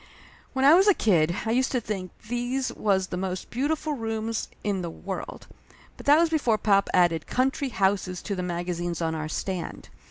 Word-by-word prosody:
When 265 Hz, 0 st, +1 dB
I 290 Hz, -, +9 dB
was 380 Hz, +4 st, +6 dB
a 405 Hz, -, +6 dB
kid 170 Hz, -5 st, +2 dB
I 225 Hz, -, 0 dB
used 260 Hz, +3 st, +2 dB
to 250 Hz, -, +2 dB
think 200 Hz, -5 st, -4 dB, 0.2 s
these 245 Hz, +2 st, -2 dB
was 195 Hz, -3 st, +1 dB
the 180 Hz, -, -5 dB
most 185 Hz, 0 st, -4 dB
beautiful 300 Hz, +4 st, -1 dB
rooms 225 Hz, -2 st, -3 dB, 0.2 s
in 200 Hz, -3 st, -1 dB
the 170 Hz, -, -4 dB
world, 190 Hz, +3 st, -7 dB, 0.5 s
but -, -, -12 dB
that 290 Hz, +1 st, +7 dB
was 330 Hz, 0 st, +3 dB
before 250 Hz, -9 st, +2 dB
pop 200 Hz, -1 st, +2 dB
added 175 Hz, -3 st, +2 dB
Country 265 Hz, +2 st, 0 dB
Houses 190 Hz, -3 st, 0 dB
to 200 Hz, -, -3 dB
the 180 Hz, -, -3 dB
magazines 175 Hz, -1 st, -3 dB
on 165 Hz, -1 st, -1 dB
our 155 Hz, -1 st, -4 dB
stand. 185 Hz, +2 st, -4 dB
205 Hz, 190 wpm, -26 LUFS, 180-255 Hz, 0.5 s, I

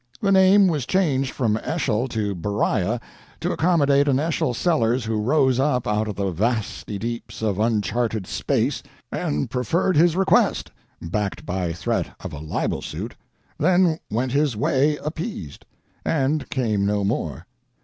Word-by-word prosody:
The 200 Hz, -, +1 dB
name 190 Hz, +1 st, +6 dB
was 150 Hz, -7 st, -1 dB
changed 140 Hz, -8 st, +1 dB
from 110 Hz, -4 st, 0 dB
Eschol 125 Hz, -3 st, -1 dB
to 110 Hz, -4 st, -2 dB
Beriah 100 Hz, +3 st, 0 dB, 0.4 s
to -, -, -1 dB
accommodate 145 Hz, -4 st, +3 dB
an 135 Hz, -1 st, +3 dB
Eschol 150 Hz, -5 st, 0 dB
Sellers 120 Hz, -6 st, +1 dB
who 110 Hz, -1 st, -1 dB
rose 130 Hz, +1 st, +2 dB
up 130 Hz, -3 st, +1 dB
out 105 Hz, +1 st, 0 dB
of 105 Hz, -, -4 dB
the 100 Hz, -1 st, -1 dB
vasty 105 Hz, +1 st, -2 dB
deeps 115 Hz, -1 st, -5 dB
of 105 Hz, -3 st, 0 dB
uncharted 110 Hz, -1 st, 0 dB
space -, -, -1 dB, 0.3 s
and 75 Hz, 0 st, -1 dB
preferred 160 Hz, -, 0 dB
his 165 Hz, +2 st, +4 dB
request—backed 105 Hz, -, 0 dB
by 90 Hz, -2 st, -2 dB
threat 85 Hz, -, -2 dB
of 95 Hz, -4 st, -7 dB
a 75 Hz, -, -6 dB
libel 80 Hz, 0 st, -2 dB
suit—then 175 Hz, 0 st, -1 dB
went 120 Hz, +4 st, -1 dB
his 140 Hz, -4 st, +1 dB
way 145 Hz, +3 st, +2 dB
appeased, 155 Hz, -, -5 dB, 0.4 s
and 150 Hz, 0 st, 0 dB
came 110 Hz, -7 st, 0 dB
no 100 Hz, 0 st, +1 dB
more. 80 Hz, -, -2 dB
120 Hz, 140 wpm, -23 LUFS, 105-150 Hz, 0.4 s, name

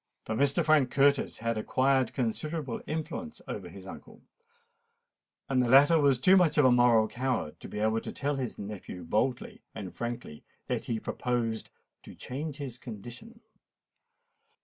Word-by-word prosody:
For -, -, -4 dB
Mr. 140 Hz, +4 st, +2 dB
Frank 150 Hz, -5 st, +4 dB
Curtis 140 Hz, +1 st, +2 dB
had 115 Hz, -1 st, -2 dB
acquired 130 Hz, +2 st, +2 dB
considerable 135 Hz, +2 st, -3 dB
influence 160 Hz, +10 st, -5 dB
over -, -, -6 dB
his -, -, -11 dB
uncle; -, -, -11 dB, 1.2 s
and 130 Hz, -2 st, +2 dB
the 120 Hz, -, 0 dB
latter 145 Hz, +5 st, +7 dB
was 140 Hz, -4 st, +3 dB
too 185 Hz, +8 st, +6 dB
much 180 Hz, -5 st, +4 dB
of 150 Hz, -, +6 dB
a 130 Hz, -, +6 dB
moral 120 Hz, -3 st, +5 dB
coward 125 Hz, -10 st, -2 dB
to -, -, -9 dB
be -, -, -7 dB
able 110 Hz, +1 st, +1 dB
to -, -, -6 dB
tell 145 Hz, 0 st, -2 dB
his 125 Hz, -4 st, -4 dB
nephew 100 Hz, -3 st, -7 dB
boldly 120 Hz, +8 st, -1 dB
and 100 Hz, -5 st, -6 dB
frankly 120 Hz, -10 st, -5 dB, 0.2 s
that -, -, -2 dB
he 115 Hz, -2 st, -2 dB
proposed 115 Hz, -2 st, -2 dB, 0.3 s
"to -, -, -12 dB
change 145 Hz, +3 st, -5 dB
his 130 Hz, -5 st, -7 dB
condition." 120 Hz, -, -10 dB
125 Hz, 155 wpm, -29 LUFS, 115-145 Hz, 1.2 s, latter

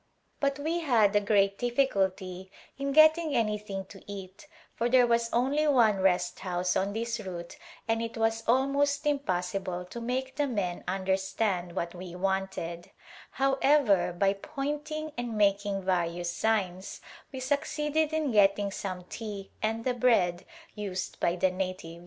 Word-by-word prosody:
But 280 Hz, -1 st, +1 dB
we 320 Hz, +4 st, -1 dB
had 215 Hz, -9 st, +3 dB
great 200 Hz, -2 st, +3 dB
difficulty 190 Hz, -7 st, 0 dB, 0.2 s
in 275 Hz, 0 st, -2 dB
getting 315 Hz, +1 st, +5 dB
anythmg 210 Hz, -5 st, -1 dB
to 195 Hz, -, -12 dB
eat 195 Hz, +7 st, -9 dB, 0.3 s
for 235 Hz, +1 st, -1 dB
there 250 Hz, 0 st, +6 dB
was 235 Hz, -1 st, +1 dB
only 275 Hz, +6 st, +2 dB
one 230 Hz, -8 st, +4 dB
Rest 180 Hz, -2 st, +1 dB
house 180 Hz, -1 st, -1 dB
on 195 Hz, +1 st, 0 dB
this 230 Hz, +1 st, -2 dB
route 180 Hz, 0 st, -7 dB, 0.3 s
and 225 Hz, 0 st, +1 dB
it 230 Hz, 0 st, -5 dB
was 225 Hz, 0 st, +1 dB
almost 280 Hz, +4 st, +2 dB
impossible 185 Hz, -9 st, -1 dB
to 235 Hz, +6 st, -8 dB
make 260 Hz, +3 st, -3 dB
the 290 Hz, -1 st, +1 dB
men 195 Hz, -8 st, -2 dB
under 190 Hz, +1 st, +1 dB
stand 190 Hz, -2 st, -2 dB
what 170 Hz, -2 st, -2 dB
we 180 Hz, -1 st, -8 dB
wanted; 190 Hz, -2 st, -2 dB, 0.4 s
however, 270 Hz, -8 st, +3 dB
by 195 Hz, +3 st, +2 dB
pointing 295 Hz, +6 st, -4 dB
and 235 Hz, -2 st, -3 dB
making 200 Hz, -1 st, +1 dB
various 175 Hz, -2 st, 0 dB
signs 190 Hz, -2 st, -1 dB, 0.3 s
we 265 Hz, -, -6 dB
succeeded 295 Hz, +3 st, 0 dB
in 310 Hz, -3 st, 0 dB
getting 200 Hz, -1 st, +3 dB
some 185 Hz, -2 st, -5 dB
tea 205 Hz, 0 st, -7 dB
and 225 Hz, +1 st, -1 dB
the 255 Hz, -, +2 dB
bread 225 Hz, -8 st, +2 dB, 0.3 s
used 195 Hz, -3 st, -5 dB
by 170 Hz, -, +1 dB
the 185 Hz, +1 st, +2 dB
natives. 185 Hz, -3 st, -4 dB
210 Hz, 145 wpm, -29 LUFS, 185-260 Hz, 0.4 s, there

